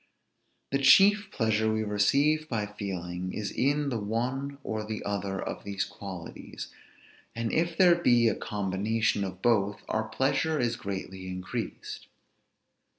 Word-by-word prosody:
The 135 Hz, -, +2 dB
chief 195 Hz, +8 st, +6 dB
pleasure 110 Hz, -, +1 dB
we 110 Hz, 0 st, 0 dB
receive 140 Hz, +10 st, +2 dB
by 110 Hz, -4 st, -1 dB
feeling, 90 Hz, -3 st, -5 dB
is 105 Hz, -2 st, -3 dB
in 145 Hz, +2 st, +1 dB
the 120 Hz, -4 st, -1 dB
one 125 Hz, +7 st, -2 dB
or 110 Hz, -1 st, -3 dB
the 110 Hz, 0 st, -5 dB
other 100 Hz, -1 st, -2 dB
of -, -, -5 dB
these 100 Hz, -1 st, -2 dB
qualities; 95 Hz, -4 st, -8 dB, 0.7 s
and 115 Hz, -1 st, -2 dB
if 170 Hz, +1 st, +1 dB
there 180 Hz, -2 st, +7 dB
be 120 Hz, -9 st, +4 dB
a 110 Hz, -, +3 dB
combination 105 Hz, +1 st, 0 dB
of 95 Hz, -1 st, -6 dB
both, 105 Hz, -4 st, +2 dB
our 110 Hz, 0 st, 0 dB
pleasure 140 Hz, +5 st, +1 dB
is 120 Hz, -1 st, +1 dB
greatly 95 Hz, -2 st, -6 dB
increased. 90 Hz, -1 st, -5 dB
110 Hz, 140 wpm, -28 LUFS, 100-135 Hz, 0.7 s, there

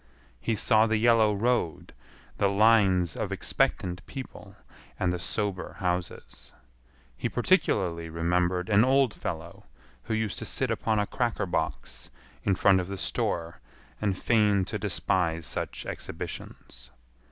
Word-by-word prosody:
He 115 Hz, -, -1 dB
saw 110 Hz, +1 st, +4 dB
the 110 Hz, 0 st, +2 dB
yellow 115 Hz, -1 st, +4 dB
road, 105 Hz, -5 st, -1 dB, 0.5 s
the 100 Hz, -, +3 dB
lines 100 Hz, -4 st, +4 dB
of -, -, -3 dB
expectant 90 Hz, -1 st, -1 dB
people, 135 Hz, -2 st, -9 dB, 0.4 s
and 90 Hz, -1 st, +1 dB
the 90 Hz, -, -3 dB
sober 100 Hz, 0 st, -3 dB
houses. 90 Hz, -1 st, -4 dB, 0.6 s
He -, -, -2 dB
particularly 95 Hz, -, +1 dB
remembered 90 Hz, +2 st, 0 dB
an 105 Hz, 0 st, +5 dB
old 130 Hz, -2 st, +3 dB
fellow 85 Hz, -1 st, -6 dB, 0.4 s
who 110 Hz, -, -1 dB
used 110 Hz, -2 st, -2 dB
to -, -, -5 dB
sit -, -, 0 dB
upon 110 Hz, -1 st, 0 dB
a 105 Hz, -, +2 dB
cracker 120 Hz, 0 st, -1 dB
box 60 Hz, -8 st, -3 dB, 0.3 s
in 95 Hz, -, +2 dB
front 95 Hz, +1 st, +4 dB
of 90 Hz, -, -3 dB
the 100 Hz, 0 st, -5 dB
store 85 Hz, -2 st, -2 dB, 0.4 s
and 100 Hz, -3 st, 0 dB
feign 105 Hz, -4 st, +3 dB
to -, -, -4 dB
despise 85 Hz, -3 st, 0 dB
such -, -, -5 dB
exhibitions. -, -, -7 dB
95 Hz, 135 wpm, -28 LUFS, 90-110 Hz, 0.6 s, an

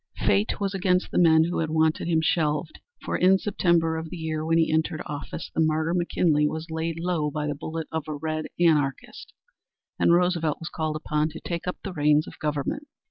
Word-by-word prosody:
Fate 205 Hz, +2 st, +1 dB
was 200 Hz, -1 st, -1 dB
against 185 Hz, -1 st, +1 dB
the -, -, +1 dB
men 160 Hz, -2 st, +6 dB
who 175 Hz, +2 st, -1 dB
had 160 Hz, -1 st, -1 dB
wanted 160 Hz, +1 st, +1 dB
him 165 Hz, -2 st, +2 dB
shelved, 155 Hz, 0 st, 0 dB, 0.3 s
for -, -, -1 dB
in 190 Hz, +1 st, +5 dB
September 170 Hz, -5 st, +1 dB
of 160 Hz, 0 st, -5 dB
the 180 Hz, -, -7 dB
year 160 Hz, -1 st, -3 dB
when 165 Hz, +1 st, +2 dB
he 165 Hz, -1 st, +2 dB
entered 160 Hz, 0 st, 0 dB
office, 145 Hz, +2 st, -6 dB
the -, -, +1 dB
martyr, 160 Hz, +1 st, +1 dB
McKinley, 170 Hz, -4 st, +2 dB
was 160 Hz, +2 st, -5 dB
laid 160 Hz, 0 st, -3 dB
low 165 Hz, -3 st, 0 dB
by 150 Hz, 0 st, -3 dB
the 145 Hz, -, -1 dB
bullet 160 Hz, +2 st, -5 dB
of 160 Hz, -1 st, -3 dB
a 155 Hz, -, -3 dB
red 155 Hz, +1 st, -3 dB
anarchist, 150 Hz, -6 st, 0 dB, 0.7 s
and -, -, +4 dB
Roosevelt 170 Hz, -3 st, +2 dB
was 165 Hz, -, -6 dB
called 155 Hz, -1 st, -3 dB
upon 150 Hz, 0 st, -1 dB
to 160 Hz, -, -9 dB
take 170 Hz, 0 st, -5 dB
up 180 Hz, -, -2 dB
the 195 Hz, -, -5 dB
reins 150 Hz, -1 st, +3 dB
of -, -, -12 dB
government. 150 Hz, -, -2 dB
160 Hz, 205 wpm, -25 LUFS, 155-170 Hz, 0.7 s, men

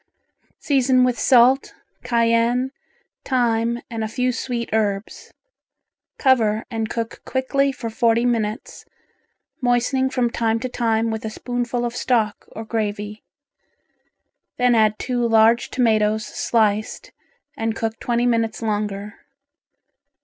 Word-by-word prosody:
Season 260 Hz, -3 st, +2 dB
with 250 Hz, -1 st, +1 dB
salt, 260 Hz, +1 st, +4 dB, 0.3 s
cayenne, 235 Hz, +1 st, +1 dB, 0.5 s
thyme 235 Hz, -2 st, 0 dB
and 225 Hz, -1 st, -4 dB
a -, -, -1 dB
few 250 Hz, +3 st, -1 dB
sweet 240 Hz, -1 st, -3 dB
herbs. 205 Hz, -2 st, -2 dB, 0.9 s
Cover 225 Hz, -5 st, +2 dB
and 225 Hz, -1 st, -2 dB
cook 230 Hz, -1 st, -4 dB
quickly 275 Hz, +1 st, 0 dB
for 255 Hz, -3 st, -6 dB
forty 235 Hz, 0 st, +2 dB
minutes, 225 Hz, 0 st, -2 dB, 0.8 s
moistening 250 Hz, +2 st, +1 dB
from 245 Hz, -2 st, 0 dB
time 225 Hz, -1 st, 0 dB
to 255 Hz, -, -2 dB
time 225 Hz, -2 st, 0 dB
with 220 Hz, 0 st, -4 dB
a 220 Hz, -, -3 dB
spoonful 245 Hz, +1 st, -3 dB
of 240 Hz, 0 st, -4 dB
stock 220 Hz, -5 st, 0 dB
or 225 Hz, -, -7 dB
gravy. 210 Hz, -1 st, -3 dB, 1.4 s
Then 250 Hz, 0 st, +3 dB
add 215 Hz, -2 st, +3 dB
two 245 Hz, -2 st, -2 dB
large 225 Hz, +1 st, +4 dB
tomatoes 220 Hz, -3 st, +1 dB
sliced, 215 Hz, -2 st, -1 dB, 0.4 s
and 225 Hz, 0 st, -2 dB
cook 225 Hz, -1 st, -3 dB
twenty 240 Hz, 0 st, 0 dB
minutes 230 Hz, -2 st, 0 dB
longer. 210 Hz, -1 st, -3 dB
230 Hz, 120 wpm, -21 LUFS, 220-245 Hz, 1.4 s, salt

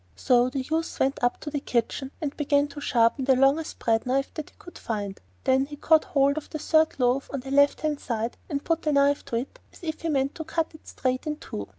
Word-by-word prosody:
So 245 Hz, -, +3 dB
the 265 Hz, +1 st, -2 dB
youth 320 Hz, +5 st, -2 dB
went 270 Hz, 0 st, 0 dB
up 245 Hz, -, +2 dB
to 295 Hz, -, -5 dB
the 290 Hz, -, -1 dB
kitchen, 260 Hz, +1 st, -1 dB
and 295 Hz, -3 st, -3 dB
began 285 Hz, -1 st, +2 dB
to 290 Hz, 0 st, -9 dB
sharpen 240 Hz, 0 st, +2 dB
the 265 Hz, -1 st, +5 dB
largest 275 Hz, +5 st, +2 dB
bread 225 Hz, +1 st, +1 dB
knife 275 Hz, +2 st, 0 dB
that 310 Hz, -2 st, -6 dB
he -, -, -28 dB
could 350 Hz, -, -13 dB
find; 205 Hz, -3 st, -4 dB, 0.2 s
then 265 Hz, +1 st, +3 dB
he 295 Hz, -, -8 dB
caught 315 Hz, +2 st, +4 dB
hold 280 Hz, -4 st, +2 dB
of 310 Hz, -, -5 dB
the 310 Hz, -, -4 dB
third 315 Hz, 0 st, +2 dB
loaf 250 Hz, +2 st, +1 dB
on 275 Hz, -, -3 dB
the 265 Hz, +1 st, -8 dB
left 285 Hz, +1 st, +4 dB
hand 305 Hz, -2 st, -1 dB
side, 230 Hz, -1 st, -3 dB
and 285 Hz, -3 st, -2 dB
put 330 Hz, -1 st, +1 dB
the 305 Hz, -, 0 dB
knife 280 Hz, 0 st, +3 dB
to -, -, -4 dB
it 265 Hz, -, -4 dB
as -, -, -18 dB
if 315 Hz, -2 st, -4 dB
he 330 Hz, -, -2 dB
meant 275 Hz, -1 st, +1 dB
to 320 Hz, -, -6 dB
cut 325 Hz, +1 st, -2 dB
it 315 Hz, -, -16 dB
straight 255 Hz, +2 st, -2 dB
in 300 Hz, -, -1 dB
two. 100 Hz, -, -6 dB
280 Hz, 250 wpm, -26 LUFS, 255-310 Hz, 0.2 s, the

